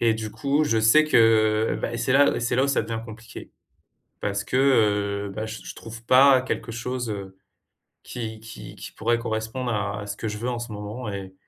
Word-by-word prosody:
Et 115 -1 +3
du 110 -1 -5
coup, 145 +5 0
je 115 -6 +1
sais 110 +8 +6
que, 110 -5 +3
bah, 120 - -2
c'est 130 - 0
là 145 +1 +4
c'est 120 +1 0
là 130 - +3
où 140 - 0
ça 140 - +1
devient 110 +1 -4
compliqué. 115 0 -11 0.7
Parce 100 0 -2
que, - - -5
heu, 105 -6 +2
bah, 110 - -3
je 110 0 -7
je - - -8
trouve 115 0 -10
pas 130 +1 +6
quelque 120 -2 -4
chose, 120 +1 -4
heu, 95 -2 -6 0.7
qui 110 -3 -6
qui 110 - -10
qui - - -9
pourrait 115 +1 0
correspondre 115 +2 -3
à 105 -1 -2
à 105 - -8
ce 100 - -4
que 110 - -4
je 105 0 -4
veux 120 +3 -3
en 120 -1 -3
ce 120 -1 -6
moment. 105 +3 -6
Et 95 -1 -7
110 Hz, 215 wpm, -24 LUFS, 105-125 Hz, 0.7 s, sais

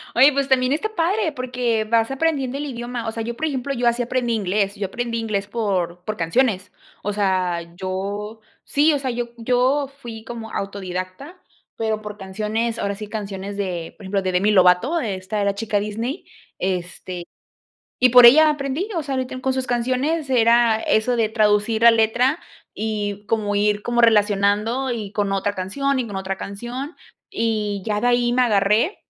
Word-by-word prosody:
Oye, 265 +5 +7
pues 275 0 0
también 255 -1 +3
está 435 +8 -1
padre 355 +2 +1
porque 245 -4 -1
vas 230 +2 +1
aprendiendo 275 -3 0
el 290 - -4
idioma, 240 -3 -5
o 225 - -1
sea, 225 0 -4
yo, 235 +1 -4
por 315 - -2
ejemplo, 275 -1 -2
yo 240 -1 0
así 235 +1 +2
aprendí 245 -1 -1
inglés, 200 -1 0
yo 200 -2 -3
aprendí 235 +3 -3
inglés 205 -3 -2
por 185 -6 -2
por 215 - -3
canciones. 190 +2 0 0.3
O 205 - -2
sea, 180 -4 -1
yo 200 +4 -4 0.2
sí, 300 +2 +3
o 285 - 0
sea, 265 -2 -3
yo 240 0 -3
yo 255 +4 +1
fui 225 -3 -8
como 225 -1 -7
autodidacta, 195 - -5 0.4
pero 220 -1 -2
por 210 -1 -8
canciones, 215 +4 -2
ahora 200 -2 -1
sí, 210 +1 -7
canciones 200 -2 -5
de, 180 -4 -4
por - - -14
ejemplo, 195 +1 -1
de 185 -1 -1
Demi 190 +4 +2
Lovato, 190 - +4
esta 200 -3 -3
era 200 0 +1
chica 210 0 -1
Disney. 225 - -4 0.3
Este, 180 -1 -4 0.8
y 255 - +6
por 245 0 +9
ella 305 +6 +8
aprendí, 295 +6 -2
o 330 - 0
sea, 275 -2 -4
ahorita 260 0 -3
en 255 - -6
con 265 +1 0
sus 260 0 -2
canciones 260 +6 0
era 235 -2 +4
eso 230 +3 +1
de 225 -2 +2
traducir 215 0 +2
la 235 - +9
letra 240 +7 +2 0.3
y 210 -1 -3
como 210 -2 0
ir 205 0 +1
como 240 +1 0
relacionando, 210 +3 +3
y 215 -4 -4
con 205 -1 -1
otra 195 +1 0
canción, 270 +9 -1
y 245 - -3
con 200 - -6
otra 190 0 -3
canción, 240 - -6 0.3
y 215 -3 -1
ya 210 -1 0
de 245 - +2
ahí 240 0 +2
me 250 +1 +3
agarré. 215 - +2
225 Hz, 185 wpm, -22 LUFS, 200-250 Hz, 0.8 s, por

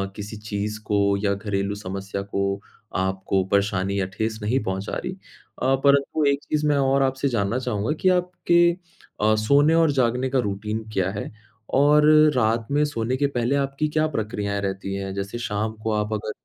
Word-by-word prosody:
किसी 105 +1 -7
चीज़ 105 0 -4
को 100 -1 +2
या 100 -1 +2
घरेलू 100 0 -2
समस्या 100 0 -5
को 100 0 -2 0.3
आपको 95 0 0
परेशानी 100 -1 +1
या 95 - +1
ठेस 110 +1 -2
नहीं 115 +6 +1
पहुँचा 95 +1 -3
रही। 180 - -4 0.5
अ, 135 +1 +3
परंतु 140 +2 +3
एक 140 0 +1
चीज़ 150 0 -1
मैं 145 -1 +3
और 135 0 +2
आपसे 135 +1 0
जानना 115 0 0
चाहूँगा 115 -2 -2
कि 185 - +4
आपके 175 -1 +3 0.5
अ, 110 +1 +4
सोने 140 +9 +4
और 165 -2 +4
जागने 130 -1 +1
का 135 0 +1
रूटीन 105 0 -3
क्या 95 -1 +1
है? 100 - -5 0.4
और 150 +2 +5 0.3
रात 115 -1 +1
में 145 +1 +3
सोने 125 -3 -2
के 140 +1 +2
पहले 125 0 0
आपकी 140 +2 0
क्या 155 +1 +1
प्रक्रियाएँ 100 -2 -2
रहती 95 0 -3
हैं? 95 0 -4
जैसे 100 +4 -4
शाम 110 -1 -2
को 110 - 0
आप 105 0 -1
अगर 105 0 -3
110 Hz, 180 wpm, -23 LUFS, 100-140 Hz, 0.5 s, और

